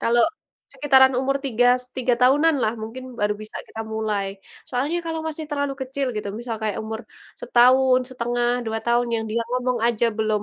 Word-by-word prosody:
Kalau 235 +1 +3 0.5
sekitaran 265 -2 +5
umur 270 +1 +1
3 245 -2 +2
s 250 - -17
3 250 -1 +2
tahunan 290 +6 +5
lah, 215 - +2
mungkin 245 +4 -7 0.2
baru 210 0 +1
bisa 215 - -9
kita 225 - -8
mulai. 215 -2 -1 0.4
Soalnya 275 +7 -1
kalau 325 -1 -2
masih 315 0 -4
terlalu 285 -1 -1
kecil 270 +1 -3
gitu, 210 -1 -3
misal 235 -2 -4
kayak 215 -2 -1
umur 220 +1 -5 0.4
1,5 255 - +3 0.2
2 225 0 -1
tahun, 240 0 +2
yang 225 -1 -1
dia 230 +1 0
ngomong 250 -1 0
aja 235 0 +2
belum 215 -1 +1
245 Hz, 175 wpm, -23 LUFS, 225-265 Hz, 0.5 s, sekitaran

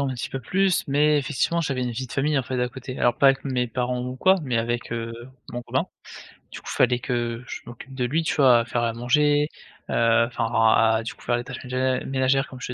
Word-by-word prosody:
un 140 - 0
petit 120 - -5
peu 135 - -5
plus, 190 +6 +1
mais 150 +2 +3
effectivement, 150 +4 0
j'avais 135 -5 -2
une 120 -1 -2
vie 130 +2 -5
de - - -10
famille 145 +2 +1
en 135 - +2
fait 125 +1 -3
à 125 - 0
côté. 130 0 -8
Alors 120 -1 +3
pas 140 - +6
avec 135 +1 +1
mes 125 -3 -1
parents 125 +1 -2
ou 125 +1 -5
quoi, 190 +7 +4
mais 125 -5 -1
avec, 120 +1 -2
heu, 115 -1 -4 0.4
mon 120 0 -5
copain. - - -1 0.7
Du - - -8
coup, - - -25
il - - -6
fallait 125 -1 +3
que 120 -1 -3
je - - -6
m'occupe 120 +3 -11
de 130 -1 -2
lui, 160 +6 0
tu - - -1
vois? 130 -5 +6
À - - -5
faire 120 0 -2
à 115 -1 0
manger, 145 +5 +2 0.4
heu, 115 0 +3
enfin 115 -1 -3 0.3
à 110 0 +3
du 115 - -5
coup - - -22
faire 120 0 0
les 120 - -4
tâches 130 0 -8
mé 130 0 0
ménagères 135 0 +1
comme 130 - -11
je 125 - -5
125 Hz, 255 wpm, -24 LUFS, 120-135 Hz, 0.7 s, pas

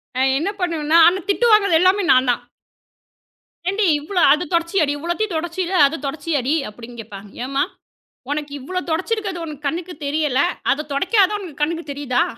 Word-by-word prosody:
நான் 265 +1 +2
என்ன 320 +7 -1
பண்ணுவேன்னா, 330 -3 +1
ஆனா 365 +2 +2
திட்டு 475 +4 +2
வாங்குவது 400 -6 +5
எல்லாமே 380 +2 +3
நான்தான். 255 -2 +2 1.3
"ஏண்டி, 400 +2 +1
இவ்வளவு 350 +5 -1
அதைத் 305 +1 -3
துடைச்சியாடி, 335 -2 +1
இவ்வளவையும் 345 +6 -2
துடைச்சில, 345 +3 -3 0.2
அதைத் 295 0 -6
துடைச்சியாடி" 285 -1 -1 0.2
அப்படின்னு 235 +2 -12
கேட்பாங்க. 205 -1 -11 0.2
"ஏம்மா, 275 +2 0 0.7
உனக்கு 295 -1 -3
இவ்வளவு 365 +8 -5
துடைச்சிருக்கறது 375 +2 -2
உன்னுடைய 300 -3 -8
கண்ணுக்குத் 335 +3 -5
தெரியவில்லை, 285 -2 +1 0.3
அதைத் 300 +2 -2
துடைக்காதது 385 +7 +3
தான் 415 -2 -4
உன் 300 -3 -14
கண்ணுக்குத் 325 0 -2
தெரியுதா?" 275 -3 0
320 Hz, 150 wpm, -20 LUFS, 280-365 Hz, 1.3 s, வாங்குவது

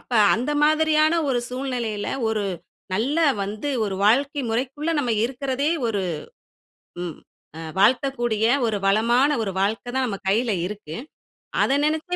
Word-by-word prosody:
அப்ப - - -29 0.2
அந்த 250 +6 -2
மாதிரியான 310 +1 +3
ஒரு 250 - +1
சூழ்நிலையில, 250 -5 -3 0.2
ஒரு 215 -2 -1 0.5
நல்ல 265 - 0 0.2
வந்து, 215 +8 -3 0.2
ஒரு 195 - -3
வாழ்க்கை 280 +6 +3
முறைக்குள்ள 270 +7 -2
நம்ம 245 -4 0
இருக்குறதே 270 +3 -1 0.2
ஒரு 205 -3 -1 1.0
ம் 170 -3 -5 0.4
அ - - -6 0.2
வாழ்த்தக்கூடிய, 240 -1 +2 0.2
ஒரு 220 - 0
வளமான, 235 +7 +3
ஒரு 195 - -2
வாழ்க்க 215 +5 0
தான் 265 -1 +1
நம்ம 200 -4 -4
கையில 225 +3 +2
இருக்கு. 190 -6 -7 0.7
அத - - +2
நெனச்சே 315 +4 0
245 Hz, 135 wpm, -23 LUFS, 215-280 Hz, 1.0 s, மாதிரியான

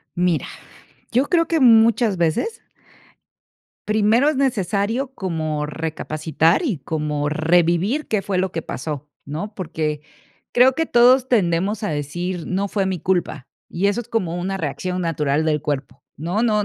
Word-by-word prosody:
Mira, 175 -2 +1 0.7
yo 255 +4 +3
creo 330 -2 +3
que 325 -2 +1
muchas 225 -3 +5
veces 170 - -1 1.3
primero 215 +6 +3
es 305 - +1
necesario 235 +1 0
como 155 - -2
recapacitar, 160 +1 0
y 245 - -1
como 150 0 -2
revivir 175 - +2
qué 215 - 0
fue 195 -1 -3
lo 185 0 0
que 165 - -2
pasó, 150 -1 -6 0.2
¿no? 165 +9 -5
Porque 155 -5 -3 0.5
creo 255 +2 +5
que 325 - 0
todos 250 -1 +5
tendemos 200 -3 +1
a 205 - -1
decir: 170 +4 -3
"No 195 +2 -1
fue 200 0 0
mi 190 -3 -2
culpa", 175 -7 -1 0.2
y 185 +4 -1
eso 205 +4 0
es - - -21
como 180 -7 -1
una 190 +2 -3
reacción 180 +4 -3
natural 155 -3 0
del 150 -2 0
cuerpo, 140 -2 -4 0.2
¿no? 175 +8 -1
No 210 -3 +2
180 Hz, 150 wpm, -21 LUFS, 155-220 Hz, 1.3 s, muchas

